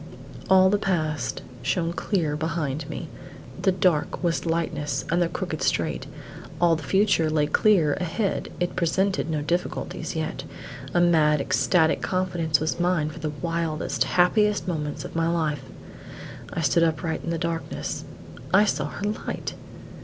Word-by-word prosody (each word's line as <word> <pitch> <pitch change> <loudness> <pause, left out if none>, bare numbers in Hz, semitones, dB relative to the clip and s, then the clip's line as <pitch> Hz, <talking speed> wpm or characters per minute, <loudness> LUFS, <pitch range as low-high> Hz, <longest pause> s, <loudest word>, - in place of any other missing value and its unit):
All 190 0 +6
the 205 - +2
past 155 - -1 0.2
shone 170 -2 0
clear 170 -6 0
behind 155 -2 -2
me; 165 - -5 0.5
the 190 - +4
dark 180 -3 +1
was 170 0 0
lightness 150 -4 -1
and 175 +1 +2
the 170 - +2
crooked - - -4
straight. - - 0 0.5
All 170 -1 +4
the 160 - -5
future 190 -1 +2
lay 155 -1 +2
clear 160 -1 +3
ahead 190 +4 -2
it 175 0 -1
presented 190 +1 +1
no 155 -2 -1
difficulties 175 +4 -2
yet; - - -3 0.5
a 175 - +2
mad, 155 -3 +4
ecstatic 155 +6 +2
confidence 175 -5 0
was 160 +2 -1
mine 175 -4 +1
for 165 - -10
the 155 -1 -2
wildest, 155 -4 -1
happiest 200 +7 +3
moments 150 -4 -3
of - - -9
my 165 0 +1
life. 155 -5 0 0.9
I - - -2
stood 165 +3 +3
upright 160 0 -1
in - - -4
the 170 - 0
darkness. 165 0 -3 0.5
I 205 +3 +6
saw - - 0
her 205 - -5
light! 210 - -4
165 Hz, 150 wpm, -25 LUFS, 155-180 Hz, 0.9 s, All